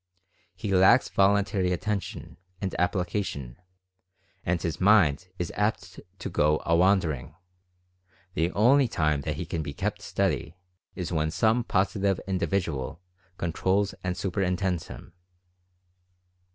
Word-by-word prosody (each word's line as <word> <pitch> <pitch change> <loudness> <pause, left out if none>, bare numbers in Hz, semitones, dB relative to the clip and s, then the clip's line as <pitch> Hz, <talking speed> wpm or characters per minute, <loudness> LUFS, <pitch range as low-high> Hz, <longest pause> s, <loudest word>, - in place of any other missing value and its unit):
He 100 - -3
lacks 95 +7 +5
voluntary 100 -1 +2
attention, 100 +3 -3 0.2
and 95 - -3
application, 90 - -2 0.9
and 85 0 0
his 85 +2 -4
mind 90 -5 +4
is 90 - -3
apt 100 -4 -2 0.2
to - - -5
"go 75 +1 +2
a 85 - +3
wandering" 85 -7 +2 0.5
— 90 0 -37
the 85 +2 0
only 130 +6 +5
time 75 -8 0
that - - -3
he - - -4
can 80 - -3
be 70 -2 -5
kept - - -2
steady - - -1 0.4
is 90 -2 -4
when 80 -2 0
some 110 +8 +2
Positive 100 -2 +1
Individual 90 -7 -2 0.4
con 85 -2 -2
trols 100 +3 +1
and 90 -1 -2
superintends 90 -2 -1
him. - - -11
90 Hz, 125 wpm, -27 LUFS, 85-100 Hz, 0.9 s, lacks